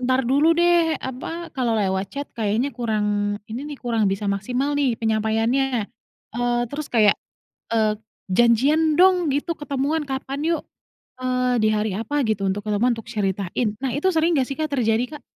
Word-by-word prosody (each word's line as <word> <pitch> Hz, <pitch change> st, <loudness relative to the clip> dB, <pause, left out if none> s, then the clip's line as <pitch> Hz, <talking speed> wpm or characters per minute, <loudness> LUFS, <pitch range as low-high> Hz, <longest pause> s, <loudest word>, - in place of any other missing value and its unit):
"Entar 255 Hz, +1 st, +1 dB
dulu 290 Hz, +7 st, +3 dB
deh, 345 Hz, -2 st, +3 dB
apa 325 Hz, +7 st, -6 dB
kalau 245 Hz, -4 st, 0 dB
lewat 190 Hz, -1 st, 0 dB
chat 285 Hz, +1 st, -5 dB
kayaknya 225 Hz, +5 st, 0 dB
kurang 210 Hz, -3 st, -1 dB
ini 225 Hz, +3 st, -5 dB
nih, 290 Hz, -, -6 dB
kurang 230 Hz, -4 st, 0 dB
bisa 195 Hz, +2 st, -2 dB
maksimal 245 Hz, +8 st, -1 dB
nih 270 Hz, -5 st, +1 dB
penyampaiannya." 225 Hz, +3 st, +1 dB, 0.5 s
Eee, 240 Hz, 0 st, 0 dB
terus 295 Hz, +1 st, -4 dB
kayak. 215 Hz, -4 st, +5 dB, 0.6 s
"Eee, 215 Hz, -2 st, +2 dB, 0.3 s
janjian 265 Hz, +10 st, +3 dB
dong 360 Hz, +1 st, +5 dB
gitu, 320 Hz, +4 st, -2 dB
ketemuan 295 Hz, +2 st, -1 dB
kapan 270 Hz, 0 st, -4 dB, 0.2 s
yuk? -, -, -4 dB, 0.6 s
Eee, 250 Hz, -1 st, +1 dB
di 215 Hz, -, +4 dB
hari 210 Hz, -2 st, 0 dB
apa 265 Hz, +6 st, -1 dB
gitu 210 Hz, -2 st, 0 dB
untuk 205 Hz, +2 st, -3 dB
ketemuan, 210 Hz, +4 st, +2 dB
untuk 225 Hz, -, -9 dB
ceritain." 205 Hz, 0 st, -2 dB
Nah 265 Hz, -2 st, -2 dB
itu 300 Hz, +7 st, +2 dB
sering 330 Hz, 0 st, +2 dB
enggak 265 Hz, -3 st, +1 dB
sih 275 Hz, -, -4 dB
Kak, 310 Hz, -, 0 dB
terjadi 245 Hz, +2 st, 0 dB
Kak? -, -, -11 dB
245 Hz, 170 wpm, -23 LUFS, 215-285 Hz, 0.6 s, kayak